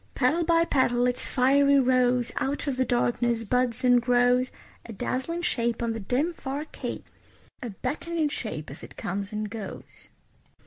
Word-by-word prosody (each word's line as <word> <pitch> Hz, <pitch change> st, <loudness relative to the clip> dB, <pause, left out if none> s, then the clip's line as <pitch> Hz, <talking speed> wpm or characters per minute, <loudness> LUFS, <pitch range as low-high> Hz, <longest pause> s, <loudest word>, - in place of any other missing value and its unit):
Petal 300 Hz, +7 st, +2 dB
by 335 Hz, 0 st, +3 dB
petal 245 Hz, -5 st, +2 dB
its 250 Hz, 0 st, -1 dB
fiery 280 Hz, +2 st, +4 dB
rose 250 Hz, -1 st, +2 dB
Out 280 Hz, +2 st, -1 dB
of 280 Hz, -3 st, -1 dB
the 260 Hz, -, +2 dB
darkness 240 Hz, -1 st, +1 dB
buds 250 Hz, +2 st, 0 dB
and 245 Hz, -1 st, +5 dB
grows; 245 Hz, +1 st, +3 dB, 0.4 s
A -, -, -7 dB
dazzling 265 Hz, -, -3 dB
shape 235 Hz, -7 st, 0 dB
on 230 Hz, -1 st, 0 dB
the 225 Hz, -, -4 dB
dim, 255 Hz, -, 0 dB
far 285 Hz, -1 st, -5 dB
cape, -, -, -6 dB, 0.6 s
A 245 Hz, -, -4 dB
beckoning 315 Hz, -, -2 dB
shape 155 Hz, -, -5 dB
as 140 Hz, -, -10 dB
it -, -, -12 dB
comes 195 Hz, +2 st, -4 dB
and 215 Hz, 0 st, -3 dB
goes. 205 Hz, -1 st, -9 dB
250 Hz, 165 wpm, -26 LUFS, 235-280 Hz, 0.6 s, and